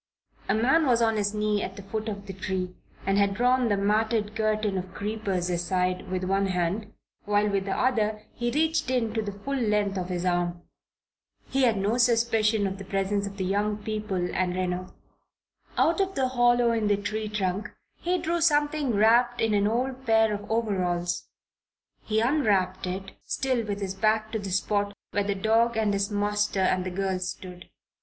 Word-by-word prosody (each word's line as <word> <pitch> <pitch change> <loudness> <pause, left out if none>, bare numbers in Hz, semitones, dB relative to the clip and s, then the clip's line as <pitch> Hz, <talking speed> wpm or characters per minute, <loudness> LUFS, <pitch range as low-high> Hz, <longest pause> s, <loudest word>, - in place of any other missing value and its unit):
A 195 - +3
man 265 +8 +3
was 240 -2 +4
on 225 -1 +2
his 205 0 0
knees 210 -1 +1
at 190 - -5
the 200 - -9
foot 215 +3 -4
of 200 -1 -6
the 195 - -7
tree 185 -1 -3 0.3
and 195 +1 +2
had 200 -1 +2
drawn 250 +1 +3
the 205 - +2
matted 210 +1 +1
curtain 215 -2 0
of 185 +1 -8
creepers 200 -4 -2
aside 180 +1 -1
with 185 0 -2
one 195 +1 +1
hand 185 +4 -1 0.3
while 205 0 +2
with 200 -2 0
the 195 - -2
other 215 -4 +1
he 240 0 -2
reached 315 +2 +1
in 240 -4 0
to 225 - 0
the 210 -1 -4
full 205 +8 -6
length 210 -5 +1
of 180 0 -4
his 180 0 -2
arm. 175 -1 0 0.9
He 270 -1 +3
had 225 -4 +2
no 205 +5 0
suspicion 225 -3 +3
of 190 0 -3
the - - -6
presence 195 +1 -1
of 200 0 -9
the 190 - -2
young 205 +2 0
people 210 -4 -2
and 180 -1 0
Reno. 185 0 -2 0.9
Out 335 +4 +3
of 385 0 -1
the 260 -1 +1
hollow 240 -1 +3
in 225 -2 0
the 205 -1 +3
tree 215 +1 -3
trunk 200 0 -2 0.3
he 360 +1 0
drew 340 0 -1
something 295 -5 +2
wrapped 240 +3 +4
in 225 -2 +2
an 205 0 +3
old 255 +3 -2
pair 220 -1 +4
of 205 0 -6
overalls. 185 -6 -1 0.7
He 220 0 0
unwrapped 205 -9 +1
it, 190 +1 -5
still 255 -3 0
with 205 0 -3
his 190 -1 -2
back 215 +2 +1
to 220 - -2
the 200 -1 -5
spot 200 +2 0 0.2
where 205 - +1
the 200 0 0
dog 225 +3 +2
and 215 -2 +2
his 200 0 0
master 205 -1 0
and 185 0 +2
the - - -1
girls 185 0 -2
stood. 180 -1 -9
210 Hz, 190 wpm, -27 LUFS, 195-230 Hz, 0.9 s, was